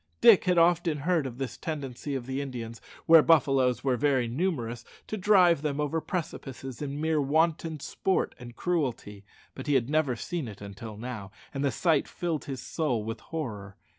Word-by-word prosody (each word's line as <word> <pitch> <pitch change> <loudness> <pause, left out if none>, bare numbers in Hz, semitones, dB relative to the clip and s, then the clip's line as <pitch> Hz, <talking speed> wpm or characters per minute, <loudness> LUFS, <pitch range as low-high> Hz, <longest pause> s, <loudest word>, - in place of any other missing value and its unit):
Dick 230 -6 +7
had 180 -1 +2
often 170 -2 +3
heard 155 -1 +1
of 125 -2 -8
this 135 -1 -4
tendency 140 -3 -4
of 130 -3 -4
the 135 +2 -3
Indians, 115 -4 -6 0.2
where 165 -1 +8
buffaloes 135 -6 +3
were 130 -2 +1
very 135 -3 +2
numerous, 120 -4 -2 0.2
to - - -4
drive 180 -5 +5
them 150 -1 -2
over 150 +2 0
precipices 135 -8 -5
in 145 0 -4
mere 160 -1 +1
wanton 160 +2 +1
sport 190 +6 -1
and 120 -1 -10
cruelty, 130 - -2 0.3
but 130 - -8
he 145 - +3
had 130 +1 +1
never 155 -5 +2
seen 160 +4 -4
it 105 -2 -9
until 105 +2 -8
now, 110 -4 -6 0.2
and 135 0 -2
the 140 - +3
sight 160 +1 +1
filled 170 -4 -3
his 135 -3 -5
soul 130 -9 -1
with 115 +1 -5
horror. 105 -11 -6
140 Hz, 180 wpm, -28 LUFS, 125-160 Hz, 0.3 s, where